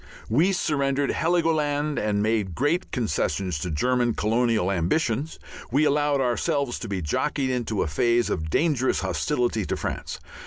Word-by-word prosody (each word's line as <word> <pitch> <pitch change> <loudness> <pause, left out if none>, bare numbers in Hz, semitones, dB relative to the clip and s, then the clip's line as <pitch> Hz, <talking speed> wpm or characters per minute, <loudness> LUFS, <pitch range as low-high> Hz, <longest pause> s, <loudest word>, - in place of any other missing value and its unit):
We 155 - +3
surrendered 140 -6 0
Heligoland, 155 -3 +1
we 105 - 0
made 105 -3 0
great 155 +7 0
concessions 95 - -1
to 90 - -3
German 120 +9 +1
colonial 110 -3 +1
ambitions, 115 - 0 0.3
we 145 +5 +3
allowed 145 -1 +2
ourselves 135 +1 0
to 115 - -6
be 95 -4 -3
jockeyed 135 - -1
into 115 -5 -1
a - - -3
phase 120 +10 +1
of 80 0 -2
dangerous 140 - +1
hostility 95 +6 0
to - - -2
France. - - -4
125 Hz, 145 wpm, -25 LUFS, 100-145 Hz, 0.3 s, We